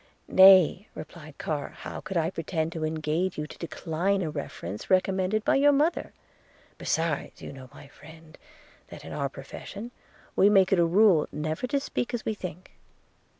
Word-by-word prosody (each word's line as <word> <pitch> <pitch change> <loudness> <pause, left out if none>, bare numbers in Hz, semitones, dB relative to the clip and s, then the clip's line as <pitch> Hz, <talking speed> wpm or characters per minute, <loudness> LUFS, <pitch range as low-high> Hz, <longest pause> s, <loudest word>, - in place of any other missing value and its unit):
'Nay,' 190 0 +7
replied 155 -1 -10
Carr, 150 -3 -3
'how - - -7
could 190 - -4
I 165 +1 +1
pretend 165 -2 -3
to 165 -2 -5
engage 155 +3 -1
you 150 - -3
to - - -12
decline 175 +3 -1
a 155 - -3
reference 95 -7 -6
recommended 190 +3 +1
by - - +3
your 290 +1 +5
mother? 300 +4 +1 0.7
Besides, 160 -3 -2
you - - -7
know, 130 -1 -12
my 145 - -13
friend, 160 +3 -15 0.5
that - - -11
in - - -8
our - - -2
profession 225 +4 -9 0.4
we 200 - +5
make 195 -2 +4
it 185 - +3
a 170 - +5
rule 185 -3 +4
never 155 +9 -3
to 280 +3 0
speak 250 -3 -3
as 230 - -6
we 220 - 0
think. 180 -3 -8
175 Hz, 170 wpm, -27 LUFS, 155-195 Hz, 0.7 s, Nay